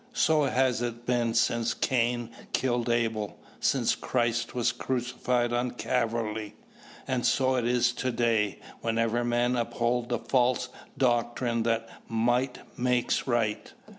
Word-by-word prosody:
So 155 Hz, -, +3 dB
has 130 Hz, -3 st, +1 dB
it 120 Hz, 0 st, -4 dB
been 120 Hz, -2 st, +1 dB
since 115 Hz, 0 st, +2 dB
Cain 120 Hz, -2 st, 0 dB, 0.2 s
killed 120 Hz, -2 st, 0 dB
Abel, 115 Hz, -3 st, 0 dB, 0.2 s
since -, -, +2 dB
Christ 120 Hz, -1 st, -1 dB
was 120 Hz, -1 st, +2 dB
crucified 125 Hz, -1 st, -1 dB
on 120 Hz, +1 st, +1 dB
Calvary, 110 Hz, -4 st, -1 dB, 0.5 s
and 125 Hz, -2 st, 0 dB
so 130 Hz, -1 st, +3 dB
it 125 Hz, -2 st, 0 dB
is 120 Hz, 0 st, +3 dB
to 130 Hz, +1 st, -2 dB
day 115 Hz, -4 st, +1 dB, 0.2 s
wherever 115 Hz, +1 st, 0 dB
men 120 Hz, +1 st, +1 dB
uphold 120 Hz, 0 st, 0 dB
the 120 Hz, -, +1 dB
false 125 Hz, +1 st, +1 dB, 0.3 s
doctrine 120 Hz, -1 st, +1 dB
that 115 Hz, 0 st, 0 dB, 0.2 s
"might 120 Hz, +3 st, +1 dB, 0.2 s
makes 125 Hz, +1 st, +1 dB
right." 115 Hz, -4 st, 0 dB
120 Hz, 130 wpm, -28 LUFS, 115-125 Hz, 0.5 s, So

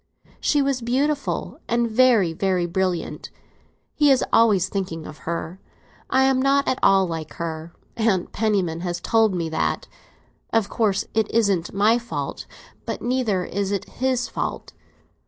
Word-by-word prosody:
She 290 Hz, -2 st, +2 dB
was 275 Hz, -2 st, 0 dB
beautiful, 280 Hz, +5 st, -1 dB
and 235 Hz, 0 st, +1 dB
very, 225 Hz, -7 st, +4 dB
very 185 Hz, 0 st, 0 dB
brilliant; 180 Hz, 0 st, -2 dB, 0.6 s
he 295 Hz, -1 st, +3 dB
is 265 Hz, -3 st, +4 dB
always 205 Hz, -6 st, +4 dB
thinking 185 Hz, -5 st, -4 dB
of 155 Hz, -, -10 dB
her. 170 Hz, +2 st, -4 dB, 0.5 s
I 265 Hz, +1 st, +3 dB
am 265 Hz, -1 st, +3 dB
not 275 Hz, +1 st, +2 dB
at 260 Hz, -, 0 dB
all 195 Hz, -1 st, +5 dB
like 160 Hz, -3 st, -5 dB
her; 165 Hz, 0 st, -5 dB, 0.3 s
Aunt 215 Hz, -6 st, +1 dB
Penniman 195 Hz, -7 st, 0 dB
has 175 Hz, 0 st, -3 dB
told 220 Hz, +1 st, +2 dB
me 170 Hz, -2 st, -1 dB
that. 160 Hz, -, -1 dB, 0.6 s
Of 225 Hz, -3 st, +1 dB
course, 205 Hz, -4 st, 0 dB
it 220 Hz, -1 st, +1 dB
isn't 200 Hz, -7 st, +1 dB
my 215 Hz, +4 st, +3 dB
fault; 240 Hz, 0 st, -5 dB, 0.4 s
but -, -, -4 dB
neither 235 Hz, -7 st, 0 dB
is 200 Hz, 0 st, -2 dB
it 200 Hz, -2 st, -2 dB
his 255 Hz, -1 st, -1 dB
fault. -, -, -4 dB
205 Hz, 150 wpm, -23 LUFS, 180-245 Hz, 0.6 s, all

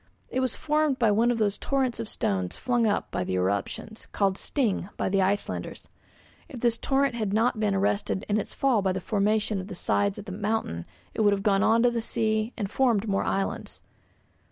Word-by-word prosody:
It 260 Hz, -, -1 dB
was 255 Hz, -2 st, 0 dB
formed 305 Hz, -2 st, +1 dB
by 230 Hz, -4 st, +3 dB
one 225 Hz, +4 st, +3 dB
of 240 Hz, -, +1 dB
those 210 Hz, -2 st, 0 dB
torrents 265 Hz, -4 st, 0 dB
of 230 Hz, -2 st, -4 dB
stones 95 Hz, -2 st, -1 dB
flung 240 Hz, -3 st, +1 dB
up 205 Hz, -, -1 dB
by -, -, -1 dB
the 95 Hz, -, -2 dB
eruptions, 100 Hz, -, -2 dB
called 195 Hz, -2 st, +1 dB
'sting' 210 Hz, -6 st, -1 dB
by -, -, 0 dB
the 195 Hz, 0 st, +2 dB
Icelanders. 200 Hz, +2 st, -2 dB, 0.6 s
If 250 Hz, -5 st, -8 dB
this 235 Hz, -2 st, +2 dB
torrent 275 Hz, -1 st, +1 dB
had 215 Hz, -4 st, -2 dB
not 225 Hz, +1 st, +2 dB
been 210 Hz, -2 st, +1 dB
arrested 200 Hz, 0 st, 0 dB
in 210 Hz, +1 st, +1 dB
its -, -, -5 dB
fall 260 Hz, -6 st, +2 dB
by 190 Hz, -1 st, +1 dB
the 190 Hz, -, -2 dB
formation 210 Hz, +1 st, 0 dB
of 185 Hz, -, -9 dB
the 200 Hz, -, -7 dB
sides 200 Hz, +3 st, 0 dB
of 205 Hz, -, -8 dB
the 195 Hz, -, -7 dB
mountain, 200 Hz, -, -2 dB, 0.3 s
it -, -, -1 dB
would 205 Hz, -1 st, +5 dB
have 195 Hz, -1 st, -2 dB
gone 195 Hz, -2 st, +3 dB
on 230 Hz, +2 st, +4 dB
to 245 Hz, -, +4 dB
the 235 Hz, -1 st, -1 dB
sea 220 Hz, 0 st, 0 dB
and 205 Hz, -4 st, -2 dB
formed 225 Hz, -2 st, +1 dB
more 195 Hz, -1 st, +1 dB
islands. 195 Hz, 0 st, -3 dB
215 Hz, 210 wpm, -27 LUFS, 195-235 Hz, 0.6 s, would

